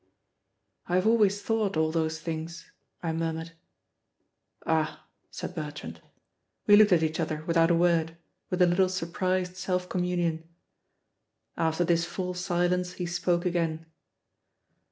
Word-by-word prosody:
"I 175 - 0
have 185 +2 +2
always 210 -3 +3
thought 215 -5 0
all 160 0 +2
those 160 -1 -1
things," 165 +1 -6 0.3
I 165 -1 -1
murmured. 165 0 -3 1.1
"Ah!" 160 -1 0 0.2
said - - -6
Bertrand. 150 - -7 0.6
We 205 - +7
looked 210 0 +6
at 170 -3 +4
each 160 +1 -1
other 155 -1 -2
without 165 -1 +3
a 170 - +4
word, 165 -1 +2 0.3
with 180 0 +2
a - - +7
little 180 +2 +3
surprised 185 +1 -2
self 180 -1 -1
communion. 175 -3 -1 1.1
After 160 +1 +1
this 170 0 +2
full 180 +1 -4
silence 180 0 0
he 180 - -4
spoke 175 0 0
again. 165 -2 -1
175 Hz, 135 wpm, -28 LUFS, 160-180 Hz, 1.1 s, We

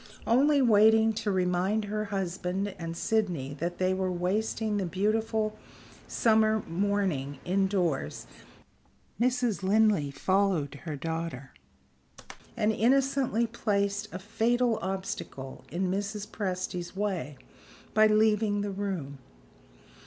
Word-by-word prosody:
Only 280 +4 +4
waiting 220 0 +5
to 210 - -1
remind 185 +3 +1
her 215 +1 -2
husband 190 0 -2
and 165 0 -5
Sydney 175 - -1
that 175 +1 -3
they 185 0 +1
were 185 0 -1
wasting 210 +4 -1
the 195 - -1
beautiful 215 +3 0 0.5
summer 220 -1 +3
morning 175 -7 -1
indoors, 180 - 0 0.9
Mrs. 245 -4 +1
Linley 200 -6 +3
followed 185 -2 +1
her 155 -3 -3
daughter 160 -3 -4 1.1
and 215 +1 +2
innocently 260 0 +2
placed 205 -2 -1
a 180 - -5
fatal 230 +4 +1
obstacle 190 -8 -5
in 180 +3 -1
Mrs. 205 +1 -3
Presty's 185 -4 -4
way 185 -9 -2 0.6
by 215 0 +6
leaving 215 -1 +3
the 205 0 -2
room. 185 -9 -4
200 Hz, 110 wpm, -29 LUFS, 180-220 Hz, 1.1 s, by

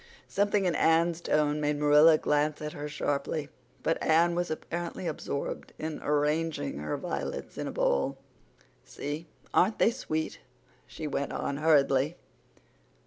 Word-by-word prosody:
Something 205 -1 +1
in 175 - +2
Anne's 165 +2 +3
tone 150 -2 +1
made 150 0 +1
Marilla 150 +2 +6
glance 150 0 +1
at 150 0 -5
her 150 0 -5
sharply, 145 0 -2 0.3
but 165 - 0
Anne 170 +2 +4
was 175 0 -1
apparently 170 +3 -4
absorbed 145 -3 -4
in 155 0 -5
arranging 150 - 0
her 75 0 -3
violets - - -4
in - - -4
a - - -3
bowl. 70 0 +1 0.7
"See, 150 +3 -6 0.3
aren't 210 +4 +3
they 225 - +4
sweet?" 160 -10 -3 0.5
she 160 - -7
went 140 -1 -2
on 140 - -2
hurriedly. 145 0 +3
155 Hz, 140 wpm, -29 LUFS, 145-165 Hz, 0.7 s, Marilla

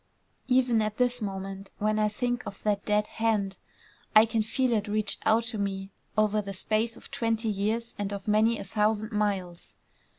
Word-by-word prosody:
Even 250 -3 +3
at 215 0 -2
this 245 -1 +1
moment 195 -1 -5
when 215 +1 +1
I 215 - +3
think 245 +3 -1
of 195 - -8
that 205 -1 +1
dead 210 0 +2
hand, 210 -4 0 0.6
I 215 +1 +9
can 225 0 0
feel 255 +3 0
it 215 -2 +1
reached 210 -1 0
out 225 +1 +4
to 215 - -3
me 195 -1 -3 0.3
over 215 0 +3
the 200 -1 -6
space 220 +4 0
of - - -14
twenty 225 -1 0
years 215 +3 -1
and 205 -1 -2
of 200 0 -6
many 220 +2 +3
a - - -5
thousand 210 +2 0
miles. 195 -5 -2
215 Hz, 185 wpm, -28 LUFS, 200-225 Hz, 0.6 s, I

